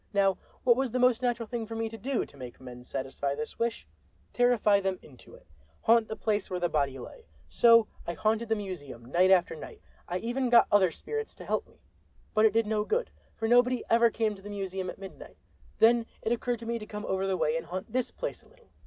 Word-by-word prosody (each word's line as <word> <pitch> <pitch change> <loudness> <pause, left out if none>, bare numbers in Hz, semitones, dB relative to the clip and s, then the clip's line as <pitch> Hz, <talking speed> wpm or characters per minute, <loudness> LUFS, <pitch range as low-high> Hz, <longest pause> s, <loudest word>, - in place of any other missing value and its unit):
Now 195 -2 +2 0.2
what 240 -2 +5
was 265 0 0
the 255 - -1
most 250 -1 +3
natural 240 -2 0
thing 230 -1 -4
for 225 - -6
me 225 0 -1
to 225 - -8
do, 245 +4 -2
to - - -19
make 125 -3 -9
men 125 -1 -10
satisfy 135 +2 -3
this 150 +1 -6
wish? 230 0 -1 0.5
Terrify 240 -4 +4
them 190 -1 -1
into 130 -5 -16
it!— - - -19 0.4
haunt 230 -1 +4
the 220 - -5
place 210 -3 -1
where 180 - -2
the 175 -1 0
body 140 -4 0
lay! 460 - -11 0.2
So 230 -1 +6 0.2
I 170 - -1
haunted 220 +7 0
the 225 - +3
museum 150 - -7
night 175 +9 +3
after 180 -3 +4
night. 155 - -10 0.3
I 180 - -2
even 245 +5 -1
got 235 -1 +7
other 195 -3 +5
spirits 445 - -5
to - - -11
help - - -1
me. - - -26 0.5
But 215 0 +5
it 210 - -1
did 225 0 +2
no 210 0 0
good, 465 - -1 0.2
for 225 - -2
nobody 245 +1 +4
ever 235 0 +6
came 220 -1 0
to 195 - -13
the 205 - -9
museum 190 -2 -4
at - - -7
midnight. 195 -1 -11 0.4
Then 230 0 +4 0.2
it 225 - -1
occurred 240 0 0
to - - -7
me 235 0 -2
to 210 - -9
come 210 0 -6
over 190 0 -1
the 190 -1 0
way 155 -2 +1
and 165 0 -3
haunt 185 +6 -6
this 255 0 0
place - - -5
a - - -23
little. - - -25
215 Hz, 235 wpm, -29 LUFS, 185-235 Hz, 0.5 s, got